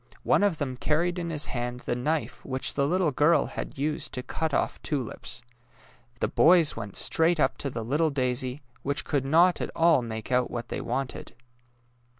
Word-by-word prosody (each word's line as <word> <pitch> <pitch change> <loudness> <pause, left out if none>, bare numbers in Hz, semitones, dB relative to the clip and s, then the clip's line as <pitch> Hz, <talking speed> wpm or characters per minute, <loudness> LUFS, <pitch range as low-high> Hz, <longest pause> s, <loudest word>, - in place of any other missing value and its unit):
One - - +3
of 200 -5 +2
them 130 -3 -3
carried 170 +6 0
in 170 -1 -3
his 150 -2 0
hand 120 0 -4
the - - -2
knife 150 +6 -2
which 130 -1 0
the 140 -1 +1
little 175 -1 +1
girl 150 +5 +3
had - - -6
used 150 +2 -2
to 125 - -4
cut 160 +4 -2
off - - -1
tulips. 125 -4 -4 0.8
The - - +2
boys 170 -2 +4
went 100 -1 -7
straight 165 +1 +3
up 130 - +2
to 140 - -1
the 115 -3 -5
little 150 +6 +1
daisy, 130 0 -2 0.2
which 140 +1 -1
could 140 -3 -1
not 170 +5 +4
at - - -2
all 165 -4 +4
make 110 0 -6
out 125 0 +2
what 120 -1 -5
they - - -3
wanted. 130 +1 -4
140 Hz, 185 wpm, -27 LUFS, 125-160 Hz, 0.8 s, boys